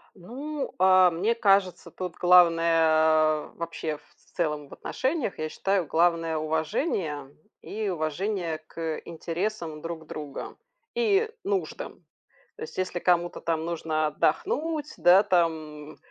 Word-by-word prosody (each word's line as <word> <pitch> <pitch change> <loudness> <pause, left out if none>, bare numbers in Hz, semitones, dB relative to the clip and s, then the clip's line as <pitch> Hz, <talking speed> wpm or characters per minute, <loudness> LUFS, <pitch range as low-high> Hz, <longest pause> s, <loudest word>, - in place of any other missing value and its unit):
Ну, 275 - -6
а, 185 -1 +6
мне 190 +8 0
кажется, 195 -6 +2
тут 180 0 -6
главное 165 -3 +4
вообще, 165 -2 -4
в - - -27 0.2
целом 150 -4 -1
в - - -20
отношениях, 265 - -2
я 155 - -2
считаю, 195 +2 0
главное- 165 0 +2
уважение 155 - -2 0.3
и 215 -1 -4
уважение 170 +1 -2
к 160 0 -5
интересам 170 -1 -4
друг 165 -1 -6
друга, 150 -2 -7 0.4
и 445 -2 +2
нуждам. 395 -1 -3 0.5
То 455 - -9
есть, 460 - -8
если 185 -1 -1
кому-то 175 -1 +1
там 160 -1 -1
нужно 160 -2 -1
отдохнуть, 295 - -1
да, 185 +3 +6
там, 160 -6 -1
170 Hz, 120 wpm, -26 LUFS, 155-195 Hz, 0.5 s, а